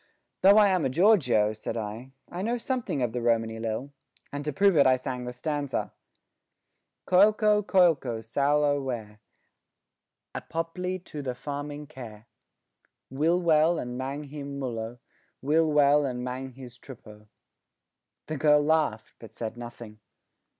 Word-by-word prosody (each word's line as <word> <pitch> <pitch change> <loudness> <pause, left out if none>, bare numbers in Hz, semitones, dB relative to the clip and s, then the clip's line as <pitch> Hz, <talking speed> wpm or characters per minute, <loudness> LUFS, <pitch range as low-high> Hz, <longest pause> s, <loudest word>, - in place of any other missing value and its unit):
"Though 200 +2 +7
I 210 -2 +6
am 185 -4 +1
a - - +1
gorgio," 130 - +3
said 110 +2 -5
I, 115 +5 -6
"I 175 - -6
know 235 +4 -1
something 240 - -2
of 120 - -1
the 125 - -2
Romany 115 -1 0
lil," 115 +5 -4 0.4
and 145 0 -5
to 150 - -1
prove 195 +5 +3
it 140 -3 +5
I 130 - +5
sang 130 -1 -5
the 125 - -4
stanza 145 +2 -3 1.1
Coliko, 210 +2 +4
coliko 165 - +2
saulo 145 +4 +1
wer 110 -5 -5 1.1
Apopli 180 +3 -4
to 150 - -7
the 130 -3 -4
farming 145 +2 -6
ker 120 -7 -11 0.9
Will 160 +6 +2
wel 165 0 +3
and 125 -4 -5
mang 135 +3 -4
him 140 -1 -7
mullo, 120 -3 -4 0.4
Will 155 +3 +2
wel 145 0 +4
and 125 -1 -4
mang 130 +1 -5
his 125 -1 -12
truppo. 105 -5 -13 1.0
The 155 - -4
girl 150 0 +4
laughed, 150 -8 0
but 115 - -12
said 115 -1 -5
nothing. 120 -2 -10
140 Hz, 145 wpm, -27 LUFS, 120-160 Hz, 1.1 s, Though